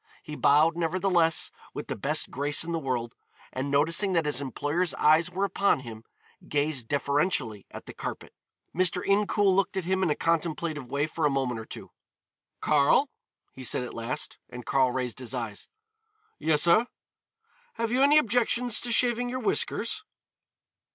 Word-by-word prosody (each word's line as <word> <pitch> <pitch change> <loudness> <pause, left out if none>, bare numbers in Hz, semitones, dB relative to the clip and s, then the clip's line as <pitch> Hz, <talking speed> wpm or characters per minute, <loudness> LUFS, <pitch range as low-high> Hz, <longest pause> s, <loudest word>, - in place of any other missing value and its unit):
He 150 -3 -7
bowed, 150 +3 +4
nevertheless, 175 -1 +1 0.2
with - - -5
the - - -4
best - - -1
grace 145 +3 +1
in 170 - -5
the 165 - -1
world, 125 -5 -3 0.4
and 130 +2 -3
noticing 165 +7 +2
that 165 -3 +1
his 145 -2 0
employer's 145 +6 -1
eyes 160 +3 +3
were 190 +2 -1
upon 200 -7 +1
him, 115 -3 -10 0.4
gazed 145 -4 -1
deferentially 140 - 0
at - - -10
the - - -10
carpet. - - -7 0.4
Mr. 180 0 +1
Incoul 200 -1 +2
looked 195 0 0
at 185 - -2
him 190 +1 0
in 185 - +1
a 150 - +1
contemplative 160 -4 -2
way 140 +2 0
for 155 +1 -5
a 150 - +4
moment 130 -4 -1
or 110 - -8
two. - - -10 0.7
"Karl," 150 - +3 0.4
he 130 - -10
said 125 - 0
at 125 - -7
last, 115 +2 -4
and 125 -2 -9
Karl 130 -1 +2
raised 125 -1 -3
his 130 0 -4
eyes. 115 -4 -5 0.7
"Yes, 150 -2 +2
sir." 195 +8 +4 0.9
"Have 230 0 -2
you 255 +2 +2
any 285 +2 +6
objections 245 -2 +3
to 240 - -1
shaving 245 +1 +2
your 255 - -3
whiskers?" 430 +5 0
155 Hz, 165 wpm, -27 LUFS, 135-190 Hz, 0.9 s, any